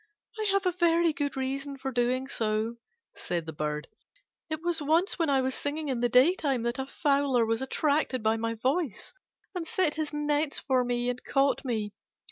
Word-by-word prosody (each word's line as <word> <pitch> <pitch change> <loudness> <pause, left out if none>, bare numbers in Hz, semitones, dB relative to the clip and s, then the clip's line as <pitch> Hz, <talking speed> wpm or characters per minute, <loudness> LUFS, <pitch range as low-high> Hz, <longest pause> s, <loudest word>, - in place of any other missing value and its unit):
"I 430 - -1
have 395 -1 +1
a 365 - +3
very 340 -1 +3
good 285 -1 -2
reason 275 +1 -3
for 265 0 -4
doing 250 +2 0
so," 220 -2 -1 0.4
said 170 -2 -3
the 160 - -6
Bird: 150 0 -3 0.6
"it 315 +1 -4
was 345 -2 0
once 325 +6 +2
when 330 -3 +2
I 270 -1 +3
was 260 0 0
singing 295 +2 -3
in 255 -3 -1
the 240 0 +2
daytime 270 -1 +3
that 235 +2 -1
a 265 - -3
fowler 275 -5 +2
was 225 +1 0
attracted 275 -2 0
by 220 +1 +3
my 230 0 -2
voice, 260 - -1 0.4
and 350 -3 -4
set 375 -9 +1
his 310 -1 -3
nets 295 0 0
for 260 -2 +1
me 245 0 -1
and 250 0 -2
caught 275 0 +2
me. 220 -5 -2
270 Hz, 190 wpm, -28 LUFS, 240-310 Hz, 0.6 s, a